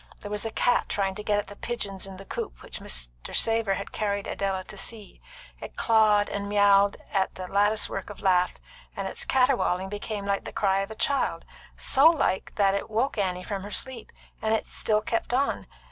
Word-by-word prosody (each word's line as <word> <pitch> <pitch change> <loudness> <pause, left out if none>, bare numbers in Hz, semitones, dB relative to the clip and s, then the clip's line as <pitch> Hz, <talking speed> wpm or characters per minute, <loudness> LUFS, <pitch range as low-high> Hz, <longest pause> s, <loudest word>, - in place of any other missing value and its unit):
There 205 - -7
was 210 +2 -1
a - - -5
cat 245 +2 +2
trying 195 -1 0
to 210 - -7
get 210 -1 +1
at 205 - -1
the 205 - -11
pigeons 200 -5 -4
in 190 -1 -9
the 195 - -11
coop - - -6
which - - -7
Mr. - - -5
Savor 225 -3 +3
had 200 - -6
carried 200 -2 -1
Idella 195 -1 -2
to 210 - -7
see. 210 0 -5 0.4
It - - -9
clawed 215 -2 +4
and 200 0 -3
miauled 205 0 +5 0.2
at 195 -2 +1
the 185 0 -6
lattice 205 +3 +3
work - - -5
of 205 - -9
lath, 180 -2 +2 0.4
and - - -2
its 485 0 -4
caterwauling 250 - +2
became 205 0 -4
like 200 0 0
the - - -6
cry 195 -1 +2
of 195 +1 -2
a 220 - -7
child, 280 +4 0 0.3
so 275 +3 +5
like 310 - +2
that 195 -2 +3
it 200 - -2
woke 225 +2 0
Annie 180 -2 -1
from 200 -1 -4
her 205 - -7
sleep, 250 +2 -2 0.3
and 220 0 +2
still 215 -1 0
kept 230 +2 -2
on. 275 +2 0
205 Hz, 205 wpm, -27 LUFS, 195-220 Hz, 0.4 s, miauled